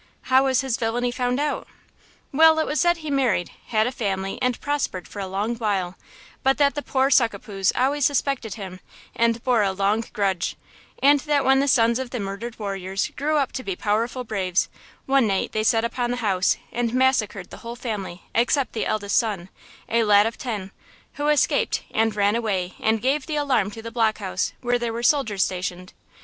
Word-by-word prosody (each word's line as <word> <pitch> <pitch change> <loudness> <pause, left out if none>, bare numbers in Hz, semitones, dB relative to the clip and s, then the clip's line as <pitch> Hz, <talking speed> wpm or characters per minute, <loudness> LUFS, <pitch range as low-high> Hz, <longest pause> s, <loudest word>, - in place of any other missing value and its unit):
"How 265 +1 +6
was 260 -1 +2
his 265 -3 -1
villainy 245 +1 -1
found 250 +1 -1
out?" 295 0 -2 0.6
"Well, 320 +2 +6
it 315 - +2
was 300 - 0
said 345 0 +3
he 310 -2 -6
married, 245 -11 +1 0.2
had 220 -1 +2
a 250 - -1
family 195 -5 -3
and 250 -1 0
prospered 285 - -2
for 205 - -9
a 195 - -3
long 205 +5 -2
while; 195 -5 -1 0.5
but 270 0 +2
that 285 -1 +3
the 290 - -3
poor 270 -1 +1
Succapoos 200 -6 +2
always 280 +3 +1
suspected 275 -6 0
him, 190 -3 -8 0.4
and 230 0 +1
bore 245 -4 +3
a 195 -2 +2
long 200 +4 +1
grudge, 195 -4 -1 0.5
and 285 +1 +6
that 290 -2 +2
when 270 0 +5
the 280 - +1
sons 235 -2 +3
of 260 -2 -4
the 250 - -4
murdered 200 +4 -5
warriors 195 -2 -3
grew 300 +2 0
up 275 -3 +1
to 260 - -5
be 195 -5 -3
powerful 230 +6 -1
braves, 190 -5 0 0.4
one 270 -3 +3
night 195 -2 0
they 215 - 0
set 225 +1 +3
upon 240 +1 -2
the 245 - -1
house 195 -6 +1
and 240 0 -1
massacred 230 -8 +1
the - - -9
whole 235 +1 -7
family 205 -7 -5
except 250 +3 +1
the 225 - -2
eldest 205 -2 -1
son, 200 -6 -3 0.4
a 230 0 +2
lad 205 -1 +5
of 225 - -2
ten, 210 -6 -5 0.4
who 290 0 -2
escaped 300 -1 +2
and 225 0 +1
ran 205 +1 +2
away 195 -6 -1
and 220 0 +1
gave 270 +2 +1
the 310 - -2
alarm 265 -9 +1
to 225 +2 -10
the 230 - -6
block 225 -2 +1
house, 190 -3 -2
where 245 0 +1
there 235 -1 -2
were 235 +1 -4
soldiers 225 -8 +2
stationed. 185 0 -4
230 Hz, 200 wpm, -23 LUFS, 200-260 Hz, 0.6 s, How